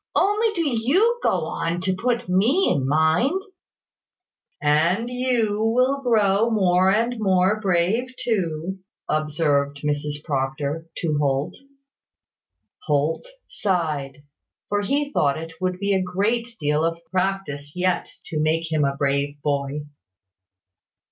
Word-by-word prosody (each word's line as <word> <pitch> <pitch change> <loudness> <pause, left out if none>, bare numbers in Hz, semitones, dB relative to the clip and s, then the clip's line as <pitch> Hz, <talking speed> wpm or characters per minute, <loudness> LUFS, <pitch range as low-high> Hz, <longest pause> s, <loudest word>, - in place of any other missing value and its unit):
"Only 420 +3 +3
do 335 -3 0
you 315 - +2
go - - +1
on 165 +1 -2
to 185 0 0
put 240 +3 -1
me 225 - +3
in 135 -2 0
mind 160 - +2 0.6
" 365 - -57
"And 165 +9 +2
you 240 -4 0
will 255 +5 +2
grow 220 -3 +3
more 185 -4 +3
and 230 +4 +1
more 190 +1 +2
brave, 195 +5 +1
too," 185 -4 -2 0.3
observed 150 -2 0
Mrs 150 0 -2
Proctor 145 +2 -2
to 155 -3 -1
Holt. 140 0 0 1.3
Holt 150 - 0 0.2
sighed; 150 -7 -2 0.5
for 205 0 +1
he 285 +7 -1
thought 140 - +2
it 165 +1 -7
would 185 0 -1
take 200 0 +1
a 190 - +2
great 205 +6 0
deal 150 +1 +1
of 165 0 0
practice 185 -7 -2
yet 180 -1 0 0.2
to 155 - -3
make 160 +1 0
him 155 -2 +2
a 140 0 0
brave 140 +1 0
boy. 145 0 -1
180 Hz, 130 wpm, -23 LUFS, 150-225 Hz, 1.3 s, Only